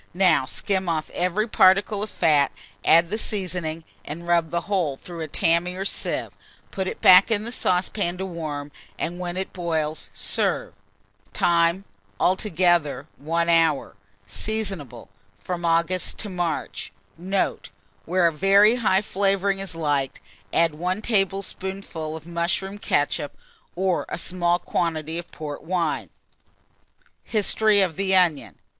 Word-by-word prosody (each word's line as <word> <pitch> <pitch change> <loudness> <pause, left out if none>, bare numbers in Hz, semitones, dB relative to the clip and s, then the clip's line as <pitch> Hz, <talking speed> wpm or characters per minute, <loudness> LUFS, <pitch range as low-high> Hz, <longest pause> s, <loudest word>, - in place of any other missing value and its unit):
Now 175 -7 +4
skim 190 +5 0
off 155 -2 -2
every 185 +5 0
particle 200 0 +4
of 215 - -3
fat, 150 -6 +3 0.3
add 170 +2 +5
the 215 - -1
seasoning, 180 -6 -3 0.2
and 170 +3 -8
rub 170 -2 +2
the 170 +1 -1
whole 175 -9 -1
through 175 +2 -10
a 160 - -3
tammy 170 +4 +1
or 190 +1 -4
sieve; - - -1 0.4
put 190 -2 -3
it - - -5
back 185 +3 +8
in 215 -2 +1
the 235 - -5
saucepan 180 -3 0
to 190 - -3
warm, 155 -5 -5 0.3
and 175 +2 -3
when 175 0 -4
it 190 - -4
boils, 160 -3 -2
serve. - - 0 0.6
Time. 170 +2 +2 0.3
Altogether 175 -6 +1
1 165 +3 -1
hour. 165 -4 +2 0.3
Seasonable 175 - -4 0.3
from 175 -1 -5
August 170 +2 +1
to 210 - -6
March. 175 -3 -3 0.2
Note. 190 +3 -2 0.4
Where 180 +1 +2
a 165 - +3
very 200 +7 +5
high 210 -4 +2
flavouring 195 0 0
is 195 -4 -5
liked, 145 -4 -1 0.3
add 165 -2 +3
1 180 +7 -2
tablespoonful 195 -5 -2
of 160 - -13
mushroom 180 +4 -2
ketchup, 145 -4 -1 0.4
or 185 0 0
a - - -3
small 175 -1 +1
quantity 165 -2 -2
of 175 - -10
port 150 -2 -6
wine. 170 -1 -1 1.1
HISTORY 215 -1 +2
OF 180 -3 -3
THE 190 -1 +1
ONION. 150 - +2
175 Hz, 140 wpm, -24 LUFS, 160-195 Hz, 1.1 s, back